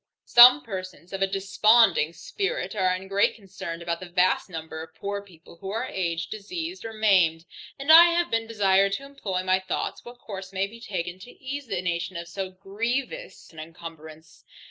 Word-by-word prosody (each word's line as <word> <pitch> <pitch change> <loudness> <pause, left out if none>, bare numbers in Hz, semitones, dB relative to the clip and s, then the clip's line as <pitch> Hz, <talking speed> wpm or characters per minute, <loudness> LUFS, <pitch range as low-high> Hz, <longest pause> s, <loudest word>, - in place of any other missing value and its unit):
Some 250 +4 +8
persons 185 -4 -8
of 195 - -4
a 195 - +3
desponding 195 -2 +3
spirit 400 - -4
are 185 -2 +2
in 190 +1 -8
great 195 +1 +2
concern 190 -5 -8
about 170 0 -2
that 180 -1 -11
vast 180 +2 +2
number 160 -2 -7
of 160 0 -11
poor 200 0 -4
people, 170 -4 -17
who 190 +3 -8
are 220 +3 -2
aged, 170 -2 -3
diseased, 330 - -6
or 225 - -6
maimed; 185 -7 +2 0.3
and 275 +3 +1
I 335 +2 +11
have 345 0 +1
been 225 0 0
desired 195 -3 +2
to 275 +8 -4
employ 205 -10 -4
my 185 0 +2
thoughts 190 - -4
what 240 +1 -11
course 195 -5 -8
may 195 0 0
be 230 +3 -12
taken, 180 -4 -5
to 200 - -12
ease 280 +1 -6
the 185 -4 -3
nation 175 +1 -2
of 170 0 -7
so 190 +2 -5
grievous 230 - -5
an 160 - -11
incumbrance. 160 -1 -11
195 Hz, 190 wpm, -25 LUFS, 175-225 Hz, 0.3 s, I